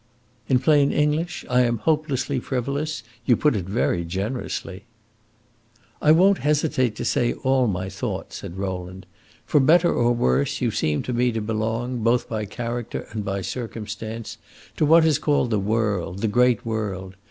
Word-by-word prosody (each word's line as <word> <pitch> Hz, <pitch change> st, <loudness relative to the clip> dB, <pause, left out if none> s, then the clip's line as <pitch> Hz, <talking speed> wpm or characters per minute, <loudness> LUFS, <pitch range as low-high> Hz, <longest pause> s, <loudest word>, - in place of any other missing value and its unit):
"In 130 Hz, -, +5 dB
plain 145 Hz, +1 st, +3 dB
English, 150 Hz, +3 st, 0 dB
I 125 Hz, 0 st, +3 dB
am 120 Hz, -1 st, +1 dB
hopelessly 145 Hz, -1 st, 0 dB
frivolous. 140 Hz, +5 st, -3 dB, 0.2 s
You 120 Hz, -, +5 dB
put 150 Hz, -5 st, +2 dB
it 95 Hz, -4 st, -2 dB
very 95 Hz, -3 st, 0 dB
generously." 95 Hz, +1 st, -4 dB, 1.2 s
"I 150 Hz, -, +5 dB
won't 190 Hz, +5 st, +5 dB
hesitate 140 Hz, -6 st, +1 dB
to -, -, -4 dB
say 120 Hz, -1 st, +1 dB
all 130 Hz, -1 st, +1 dB
my 95 Hz, -2 st, -2 dB
thought," 95 Hz, +1 st, -5 dB
said 85 Hz, -, -7 dB
Rowland. 95 Hz, -1 st, -5 dB, 0.4 s
"For 150 Hz, -, +3 dB
better 165 Hz, +5 st, +4 dB
or 120 Hz, 0 st, +2 dB
worse, 70 Hz, -, +1 dB
you -, -, 0 dB
seem 75 Hz, -1 st, 0 dB
to 125 Hz, -, -3 dB
me 120 Hz, +1 st, +2 dB
to 110 Hz, -, -1 dB
belong, 115 Hz, +3 st, -2 dB
both 120 Hz, +2 st, +2 dB
by 110 Hz, -2 st, -3 dB
character 120 Hz, +3 st, -5 dB
and 105 Hz, -1 st, -4 dB
by 95 Hz, 0 st, -2 dB
circumstance, 110 Hz, +1 st, -6 dB, 0.4 s
to 155 Hz, -, +2 dB
what 165 Hz, +1 st, +6 dB
is 155 Hz, -4 st, +3 dB
called 145 Hz, -5 st, +1 dB
the 105 Hz, -, +2 dB
world, 105 Hz, -3 st, -1 dB
the 115 Hz, -, +1 dB
great 120 Hz, +2 st, +2 dB
world. 100 Hz, -4 st, -4 dB
120 Hz, 165 wpm, -23 LUFS, 105-140 Hz, 1.2 s, what